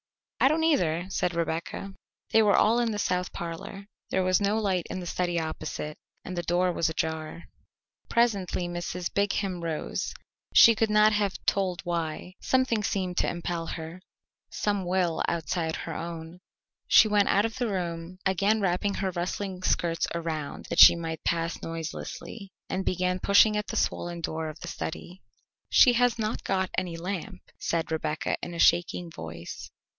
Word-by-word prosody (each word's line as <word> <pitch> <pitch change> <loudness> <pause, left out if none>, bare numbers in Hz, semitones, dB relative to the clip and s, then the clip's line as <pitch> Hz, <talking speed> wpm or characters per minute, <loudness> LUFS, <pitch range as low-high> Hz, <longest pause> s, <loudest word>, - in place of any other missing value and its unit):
"I - - +6
don't 315 +3 +2
either," 175 - +2
said 175 -1 0
Rebecca. 170 +4 -3 0.4
They 225 - +6
were 210 -2 +4
all 225 +3 +4
in 240 -1 +1
the 210 - -3
south 180 -2 -1
parlour. 170 +4 -6 0.2
There 190 - +1
was 185 +1 +2
no 200 +2 +2
light 190 -5 0
in - - -4
the 180 - -6
study 175 0 -1
opposite, 155 -1 -4 0.3
and 185 - -5
the 175 - -1
door 180 +1 +1
was 165 - +1
ajar. 160 +1 -3 0.7
Presently 200 -7 +1
Mrs. 175 0 -4
Brigham 195 -3 0
rose 160 -2 -3 0.4
she 230 - +9
could 220 0 +1
not 210 0 +5
have 205 -2 0
told 185 -3 0
why; 170 0 -3
something 260 -4 +1
seemed 185 -3 -2
to - - +2
impel 170 -1 -3
her, 165 +3 -6 0.5
some 205 -2 -1
will 180 -2 0
outside 165 -1 -1
her 165 - -5
own. 165 +1 -6 0.5
She - - +7
went 205 -1 +3
out 205 +2 +3
of 225 +2 -4
the 245 - +1
room, 175 -3 -4
again 200 +3 +2
wrapping 195 +1 0
her 190 -1 -1
rustling 185 +1 -3
skirts 170 -2 0
around 160 -3 -4
that - - 0
she - - +11
might 165 -1 -5
pass 165 0 -1
noiselessly, 165 +5 -6 0.2
and 190 - -2
began 180 0 0
pushing 205 +3 +5
at 210 0 -2
the - - -5
swollen 175 0 -1
door 160 0 -3
of 155 - -10
the 170 - -6
study. 175 +2 -6 0.5
"She 250 - +7
has 245 0 +3
not 220 0 -2
got 190 -1 0
any 180 -3 -2
lamp," 180 +1 -5 0.2
said 165 -1 -1
Rebecca 155 0 -1
in 175 - -5
a - - -6
shaking 175 0 +3
voice. 80 - -8
180 Hz, 170 wpm, -27 LUFS, 165-200 Hz, 0.7 s, she